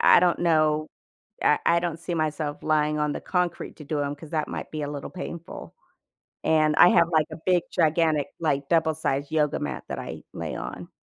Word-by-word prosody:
I - - +7
don't 175 -1 +2
know, 155 -2 +2 0.6
I 150 - +5
I 170 - +4
don't 170 -2 -3
see 175 - -4
myself 155 -2 -2
lying 150 -1 +1
on 150 -1 0
the - - -5
concrete 180 -2 -2
to 150 - -10
do 150 0 -2
'em 140 0 -2
because 150 +1 -11
that 155 -2 -1
might - - -6
be 155 -1 -3
a 145 - -3
little 145 -1 -6
painful. 170 -2 -8 0.7
And, 155 -1 +3
I 175 - +8
have, 170 - +4
like, 155 -1 +3
a - - -5
big, 180 -2 +3
gigantic, 160 -3 +2
like, 140 -3 0
double-sized 160 -4 0
yoga 150 -2 +1
mat 75 - -4
that - - -4
I - - -7
lay - - -5
on. - - -6
155 Hz, 200 wpm, -25 LUFS, 150-170 Hz, 0.7 s, I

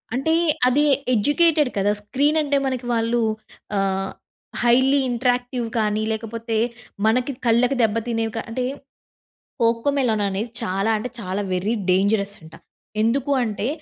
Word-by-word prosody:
అంటే 275 +5 +1 0.3
అది 270 +4 +3 0.3
ఎడ్యూకెటెడ్ 295 +5 +3
కదా! 200 +1 +2
స్క్రీన్ 285 +9 +1
అంటే 285 -1 +1
మనకి 260 -2 -2
వాళ్ళు 230 +1 +1 0.6
ఆహ్, 195 0 -1 0.5
హైలీ 260 +4 +4
ఇంటెరాక్టివ్ 245 0 0
కానీ 215 0 0
లేకపోతే, 225 +1 -3 0.5
మనకి 245 +5 +2
కళ్ళకి 240 +3 +3
దెబ్బ 215 -1 +2
తినేవి 225 -2 -1
కా 225 - -1
అంటే 250 +2 -2 1.0
'కోకోమెలన్' 230 -1 +1
అనేది 200 +4 -3
చాలా 195 0 -1
అంటే 215 +4 -4
చాలా 190 -1 -3
వెరీ 190 +5 0 0.2
డేంజరస్ 200 +2 +1
అంట. 160 0 -15 0.5
ఎందుకు 255 +5 +1
అంటే 215 -1 -2
230 Hz, 125 wpm, -22 LUFS, 210-255 Hz, 1.0 s, హైలీ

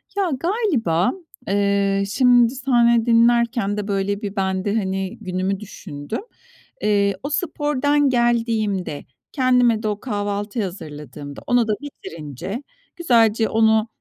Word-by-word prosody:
Ya, 395 -3 +1
galiba, 300 - +1 0.4
eee, 200 0 +1
şimdi 245 0 +4
senle 240 -3 +3
dinlerken 235 -2 +3
de, 210 0 -3
böyle, 200 0 -1
bir 200 -1 -5
ben 190 -1 -1
de, 205 +1 0
hani, 190 -3 -2
günümü 185 0 -2
düşündüm. 175 - -7 0.6
Eee, 200 -1 +2
o 285 - -3
spordan 290 -2 +1
geldiğimde, 230 - 0 0.3
kendime 250 -4 +3
de 215 - 0
o 210 -1 -2
kahvaltıyı 205 -1 -3
hazırladığımda 150 - -8
onu 245 -2 +3
da 215 - +1
bitirince 165 - -7 0.3
güzelce 230 - +3
onu, 220 0 +3
215 Hz, 120 wpm, -21 LUFS, 195-245 Hz, 0.6 s, şimdi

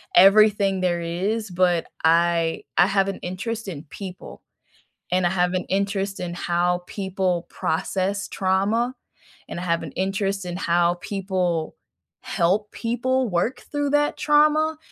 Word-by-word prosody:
everything 200 0 +6
there 175 -2 0
is, 195 +6 -2
but 175 -1 +2 0.2
I 165 0 +2
I - - +6
have 195 0 +2
an - - -4
interest 215 +4 -5
in 155 -6 -6
people, 185 +4 -9 0.7
and 180 -1 +3
I - - +1
have 180 0 +1
an 185 - -1
interest 195 0 -1
in 175 -1 -4
how 175 +1 0
people 190 -3 -2
process 190 +4 -2
trauma, 205 +6 0 0.5
and - - -6
I 175 - -5
have 170 -1 0
an 150 - -7
interest 195 +1 -1
in 175 0 -5
how 175 -1 +2
people 185 -5 -2 0.5
help 195 +5 +1
people 250 +2 -1
work 180 +8 -1
through 290 -1 0
that 295 0 +2
trauma, 305 +1 +3
190 Hz, 140 wpm, -23 LUFS, 175-210 Hz, 0.7 s, everything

